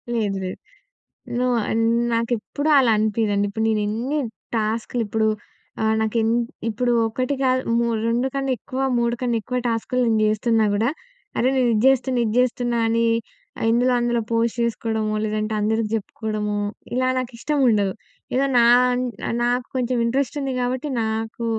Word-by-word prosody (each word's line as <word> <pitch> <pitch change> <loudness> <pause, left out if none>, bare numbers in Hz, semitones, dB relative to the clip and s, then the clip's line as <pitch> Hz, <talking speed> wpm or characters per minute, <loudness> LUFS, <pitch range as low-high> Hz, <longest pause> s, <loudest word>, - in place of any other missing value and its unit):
లేదు, 205 -4 0
లేదు. 185 - -6 0.8
నో. 250 - +1 0.2
ఆహ్, - - -2 0.4
నాకెప్పుడూ 230 +6 -1
అలా 250 -4 +4
అనిపియదండి. 210 -1 +1
ఇప్పుడు 220 +2 -2
నేను 215 -1 +1
ఎన్ని 245 +8 -1 0.4
టాస్కులిప్పుడు 220 0 -1 0.5
ఆహ్, 220 0 +2
నాకు 220 +1 -1
ఎన్ 225 - +1 0.4
ఇప్పుడు 240 +3 0 0.2
ఒకటి 255 +5 -2
కాదు 255 0 +2 0.2
మూ 235 - +1 0.2
2 240 +3 +1
కన్నెక్కువ 260 -2 -2 0.2
3 235 0 +1
కన్నెక్కువ 245 +1 -1
టాస్కులు 235 +2 -1
నేను 220 -1 +2
జేస్తున్నా 220 +1 +2
గుడా, 220 +4 +2 0.5
అరే! 255 - +3
నేను 250 -2 +3
ఇది 215 - +2
జేస్తున్నా, 260 -1 +2
ఇది 215 - -1
జేస్తున్నా 245 -1 +1
అని 230 +1 +2 0.6
ఆహ్, - - 0
ఇందులో 245 +2 +3
అందులో 240 -1 +1
పోస్ట్ 230 +1 +1
జేసుకోవడమో. 220 -2 -1
లేదంటే? 215 0 -2
అందరికి 220 +1 0
జెప్పుకోవడమో 210 0 -3 0.4
ఇలా 255 0 +1
నాకు 255 0 -4
ఇష్టం 295 +3 -1
ఉండదు. 200 -4 +2 0.4
ఏదో 275 +1 +3
నా 235 - +6 0.6
అన్ 235 - -1
నాకు 245 0 0
కొంచెం 250 0 0
ఇంట్రెస్టుంది 270 +2 -1
గాబట్టి, 255 +4 -2
నాకు 220 +1 -3
230 Hz, 145 wpm, -22 LUFS, 220-250 Hz, 0.8 s, నా